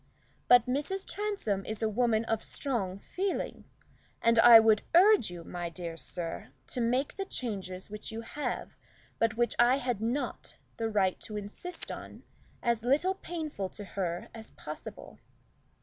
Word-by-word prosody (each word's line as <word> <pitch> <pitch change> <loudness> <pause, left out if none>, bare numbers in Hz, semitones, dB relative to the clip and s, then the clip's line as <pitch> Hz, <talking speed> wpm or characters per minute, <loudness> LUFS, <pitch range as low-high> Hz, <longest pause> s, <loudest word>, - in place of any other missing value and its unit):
But 245 -2 +7
Mrs. 295 +10 -2
Transome 395 - -2
is 220 +2 -4
a - - +3
woman 225 0 +2
of 225 -1 0
strong 210 -10 -2
feeling, 375 - -3 0.5
and 230 0 +4
I 230 -1 +11
would 220 -2 +4
urge 395 - +6
you, 175 -1 -8
my 175 0 -4
dear 170 0 -6
sir, 165 -5 -4 0.2
to 250 - -2
make 250 +4 +1
the 390 - -1
changes 195 - -5
which 210 +1 -7
you 225 +1 -5
have, 290 +6 -4 0.5
but 225 -1 +1
which 240 0 +2
I 240 +2 +6
had 245 -5 -2
not 240 +6 -3 0.2
the 225 -1 -1
right 195 -4 +1
to 210 - -6
insist 210 - -6
on, - - -9 0.4
as 235 -2 +1
little 295 +10 +3
painful 315 - -5
to 205 - -8
her 180 -3 -3
as 220 -1 -9
possible." - - -9
225 Hz, 155 wpm, -30 LUFS, 200-265 Hz, 0.5 s, I